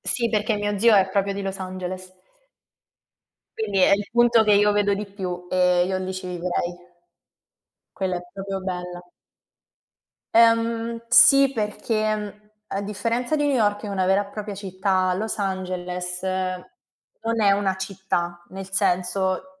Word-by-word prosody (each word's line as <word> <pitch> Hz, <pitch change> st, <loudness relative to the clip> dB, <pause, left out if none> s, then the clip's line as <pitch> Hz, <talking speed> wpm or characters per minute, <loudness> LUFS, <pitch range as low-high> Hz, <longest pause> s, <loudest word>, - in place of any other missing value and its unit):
Sì, 235 Hz, -2 st, 0 dB
perché 215 Hz, 0 st, 0 dB
mio 205 Hz, 0 st, -2 dB
zio 220 Hz, +1 st, +5 dB
è 190 Hz, -1 st, +4 dB
proprio 200 Hz, +1 st, 0 dB
di 200 Hz, 0 st, -5 dB
Los 195 Hz, 0 st, -4 dB
Angeles. 185 Hz, 0 st, -6 dB, 1.5 s
Quindi 205 Hz, -3 st, -1 dB
è -, -, +5 dB
il 200 Hz, 0 st, -4 dB
punto 240 Hz, -1 st, +4 dB
che 210 Hz, -, +4 dB
io 205 Hz, +1 st, +4 dB
vedo 205 Hz, -1 st, +2 dB
di 205 Hz, +1 st, -4 dB
più. 185 Hz, -3 st, -6 dB
Ehm, 180 Hz, -1 st, +3 dB
io 190 Hz, 0 st, -1 dB
lì 185 Hz, 0 st, -4 dB
ci 185 Hz, 0 st, -6 dB
vivrei. 175 Hz, 0 st, -2 dB, 1.2 s
Quella 185 Hz, -2 st, -2 dB
è -, -, -7 dB
proprio 195 Hz, 0 st, -5 dB
bella. 180 Hz, -1 st, -5 dB, 1.3 s
Ehm 230 Hz, 0 st, +3 dB
sì, 275 Hz, +3 st, +7 dB
perché, 215 Hz, -1 st, -1 dB
mhmm, 210 Hz, 0 st, -9 dB, 0.2 s
a 195 Hz, -, -3 dB
differenza 230 Hz, +7 st, -1 dB
di 295 Hz, -1 st, +1 dB
New 285 Hz, -, +2 dB
York, 205 Hz, -4 st, +1 dB
che -, -, -7 dB
è -, -, -5 dB
una 190 Hz, -2 st, 0 dB
vera 195 Hz, +1 st, +2 dB
e -, -, -15 dB
propria 210 Hz, -1 st, -6 dB
città, 190 Hz, -1 st, 0 dB
Los 215 Hz, +4 st, -3 dB
Angeles 180 Hz, -2 st, -3 dB
non 190 Hz, +4 st, -5 dB
è 200 Hz, -, +5 dB
una 200 Hz, -1 st, 0 dB
città. 190 Hz, -2 st, -3 dB
Nel 190 Hz, 0 st, -8 dB
senso 190 Hz, +9 st, -1 dB
195 Hz, 155 wpm, -23 LUFS, 185-215 Hz, 1.5 s, sì